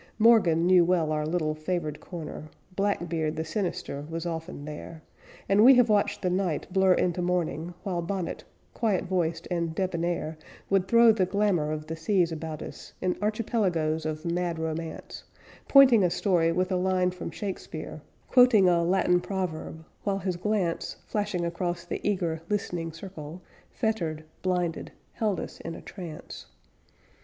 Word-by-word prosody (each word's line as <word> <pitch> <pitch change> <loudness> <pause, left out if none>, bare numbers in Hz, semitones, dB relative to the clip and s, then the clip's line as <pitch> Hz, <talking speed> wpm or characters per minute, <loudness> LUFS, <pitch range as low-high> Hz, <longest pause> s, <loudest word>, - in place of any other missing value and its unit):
Morgan 215 -8 +5
knew 180 -1 +6
well 170 -3 +2
our 150 0 0
little 155 -2 0
favored 155 -1 -3
corner; 155 -3 -8 0.3
Black 200 -3 0
Beard 160 -2 -1
the 160 - -3
sinister 160 -5 -3
was 165 +1 -4
often 165 -3 -5
there; 155 +1 -8 0.4
And 200 +2 +5
we 265 +2 +9
have 245 -2 +5
watched 205 -1 +1
the 180 - +2
night 180 -4 0
blur 190 -1 +5
into 180 0 0
morning 175 -1 -1
While 180 -3 -2
Bonnet, 180 0 -3 0.3
quiet 215 -6 +1
voiced 170 -3 -1
and 170 -2 -1
debonnaire, 170 -3 -2 0.3
Would 195 -1 +3
throw 235 +2 +7
the 195 -4 +1
glamor 190 -6 +1
of 155 0 -4
the 160 - -5
seas 170 +1 +1
about 160 -1 -5
us - - -10
In 185 -1 0
archipelagoes 185 -8 0
of 155 +1 -4
mad 170 0 -1
romance; 160 0 -5 0.4
Pointing 260 -7 +7
a 180 - +4
story 170 -3 +2
with 185 +2 0
a 185 - +2
line 185 0 +1
from 180 -2 -6
Shakespeare, 165 -4 -6 0.3
Quoting 245 -7 +6
a 175 -1 +4
Latin 180 0 +3
proverb; 165 -4 -4 0.2
while 200 -1 0
his 190 -2 -2
glance, 185 -2 -1
Flashing 205 -5 -1
across 175 0 -3
the - - -4
eager, 175 -6 -1
listening 175 -5 -2
circle, 165 -1 -9 0.3
Fettered 170 -9 -2 0.2
blinded 180 -3 -1 0.2
held 210 -4 0
us - - -7
in 165 - -6
a - - -9
trance. 175 -5 -9
175 Hz, 155 wpm, -27 LUFS, 160-195 Hz, 0.4 s, we